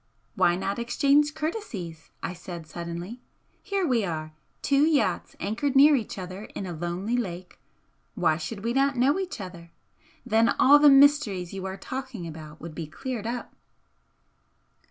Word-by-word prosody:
"Why 175 Hz, -, +3 dB
not 195 Hz, +4 st, -3 dB
exchange 285 Hz, +5 st, +2 dB
courtesies?" 275 Hz, -, -5 dB
I -, -, -3 dB
said, 175 Hz, -2 st, -8 dB
suddenly, 170 Hz, +8 st, -7 dB, 0.4 s
"Here 395 Hz, -2 st, -1 dB
we 245 Hz, -7 st, +2 dB
are 155 Hz, -4 st, -4 dB, 0.3 s
two 280 Hz, 0 st, +3 dB
yachts 305 Hz, -1 st, +1 dB
anchored 255 Hz, +7 st, -1 dB
near 290 Hz, +2 st, +8 dB
each 230 Hz, -6 st, -3 dB
other 185 Hz, +2 st, -7 dB
in 195 Hz, -, -4 dB
a 180 Hz, -, -5 dB
lonely 175 Hz, +7 st, -2 dB
lake, 185 Hz, -6 st, -4 dB, 0.6 s
why 165 Hz, -6 st, +2 dB
should 200 Hz, +5 st, -6 dB
we 235 Hz, +1 st, 0 dB
not 275 Hz, +1 st, +2 dB
know 275 Hz, +8 st, +3 dB
each 375 Hz, -9 st, -4 dB
other? 175 Hz, -3 st, -9 dB, 0.6 s
Then 225 Hz, +2 st, +3 dB
all 290 Hz, +3 st, +7 dB
the 295 Hz, 0 st, +8 dB
mysteries 275 Hz, -, +4 dB
you 190 Hz, -1 st, -4 dB
are 190 Hz, 0 st, -5 dB
talking 260 Hz, -7 st, -6 dB
about 155 Hz, -1 st, -9 dB
would 165 Hz, -1 st, -8 dB
be 160 Hz, 0 st, -6 dB
cleared 235 Hz, -, -5 dB
up." 240 Hz, +1 st, -5 dB
215 Hz, 155 wpm, -26 LUFS, 175-275 Hz, 0.6 s, near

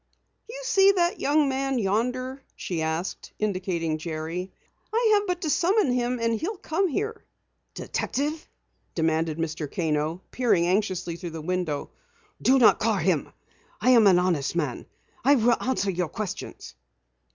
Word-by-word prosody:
"You -, -, -7 dB
see 395 Hz, -4 st, +5 dB
that 345 Hz, -2 st, +1 dB
young 290 Hz, +1 st, +3 dB
man 270 Hz, 0 st, -1 dB
yonder?" 250 Hz, +6 st, -1 dB
she 170 Hz, -3 st, -3 dB
asked, 160 Hz, +3 st, -3 dB
indicating 185 Hz, -6 st, -1 dB
Jerry. 165 Hz, +3 st, -4 dB, 0.4 s
"I 450 Hz, 0 st, +3 dB
have 410 Hz, 0 st, +2 dB
but 360 Hz, -1 st, -2 dB
to 315 Hz, -, -1 dB
summon 370 Hz, -, +2 dB
him 245 Hz, 0 st, 0 dB
and 230 Hz, 0 st, +1 dB
he'll 395 Hz, +5 st, -3 dB
come 360 Hz, +3 st, 0 dB
here." 430 Hz, +8 st, -3 dB, 0.5 s
"Detective?" 300 Hz, +3 st, -3 dB, 0.5 s
demanded 160 Hz, -1 st, 0 dB
Mr. 160 Hz, -3 st, -3 dB
Kano, 160 Hz, +1 st, -1 dB
peering 230 Hz, -9 st, +2 dB
anxiously 185 Hz, -2 st, 0 dB
through 175 Hz, 0 st, -6 dB
the -, -, -6 dB
window. 175 Hz, -3 st, -2 dB, 0.5 s
"Do 265 Hz, +2 st, +5 dB
not 255 Hz, -, +6 dB
call -, -, +2 dB
him! -, -, 0 dB, 0.5 s
I 255 Hz, -, +4 dB
am 230 Hz, -4 st, +7 dB
an 185 Hz, -2 st, +6 dB
honest 170 Hz, -5 st, 0 dB
man. 150 Hz, -8 st, -2 dB, 0.4 s
I 280 Hz, +4 st, +6 dB
will 240 Hz, -1 st, +4 dB
answer 240 Hz, -6 st, 0 dB
your 175 Hz, -2 st, -2 dB
questions." 210 Hz, -4 st, -6 dB
210 Hz, 150 wpm, -26 LUFS, 170-275 Hz, 0.5 s, am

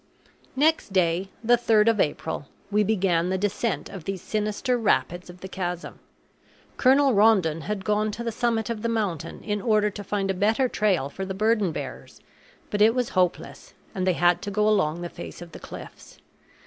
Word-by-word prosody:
Next 310 Hz, -4 st, +2 dB
day, 180 Hz, 0 st, +1 dB
the 240 Hz, +2 st, +5 dB
3rd 225 Hz, -2 st, +3 dB
of 225 Hz, -2 st, +1 dB
April, 150 Hz, -2 st, -1 dB, 0.2 s
we 210 Hz, +1 st, +3 dB
began 185 Hz, -5 st, +1 dB
the 190 Hz, -, 0 dB
descent 205 Hz, +3 st, -1 dB
of 185 Hz, -5 st, -9 dB
these 195 Hz, -2 st, -4 dB
sinister 215 Hz, +4 st, -1 dB
rapids 185 Hz, -6 st, 0 dB
of 180 Hz, 0 st, -12 dB
the 190 Hz, -, -6 dB
chasm. 180 Hz, -2 st, -5 dB, 0.8 s
Colonel 270 Hz, +1 st, +4 dB
Rondon 195 Hz, -7 st, +3 dB
had 210 Hz, -2 st, -3 dB
gone 210 Hz, 0 st, +1 dB
to 235 Hz, -, -5 dB
the 230 Hz, -, -2 dB
summit 230 Hz, -1 st, -1 dB
of 220 Hz, -2 st, -4 dB
the 230 Hz, -, -1 dB
mountain 205 Hz, -9 st, -3 dB
in 210 Hz, -1 st, -2 dB
order 210 Hz, -1 st, +2 dB
to 205 Hz, +1 st, -7 dB
find 195 Hz, -1 st, -1 dB
a -, -, -1 dB
better 215 Hz, +7 st, +2 dB
trail 195 Hz, -, +1 dB
for 190 Hz, +7 st, -6 dB
the 190 Hz, 0 st, -4 dB
burden 215 Hz, -2 st, +2 dB
bearers, -, -, -7 dB, 0.5 s
but 205 Hz, -, -1 dB
it 225 Hz, +3 st, +5 dB
was 250 Hz, -2 st, 0 dB
hopeless, 180 Hz, -2 st, -2 dB, 0.2 s
and 185 Hz, -1 st, -2 dB
they 185 Hz, -, +4 dB
had 175 Hz, 0 st, +3 dB
to -, -, -4 dB
go 210 Hz, +1 st, +1 dB
along 175 Hz, -6 st, +1 dB
the -, -, -3 dB
face 175 Hz, -, -9 dB
of 175 Hz, -1 st, -10 dB
the -, -, -10 dB
cliffs. -, -, -11 dB
205 Hz, 190 wpm, -25 LUFS, 180-220 Hz, 0.8 s, the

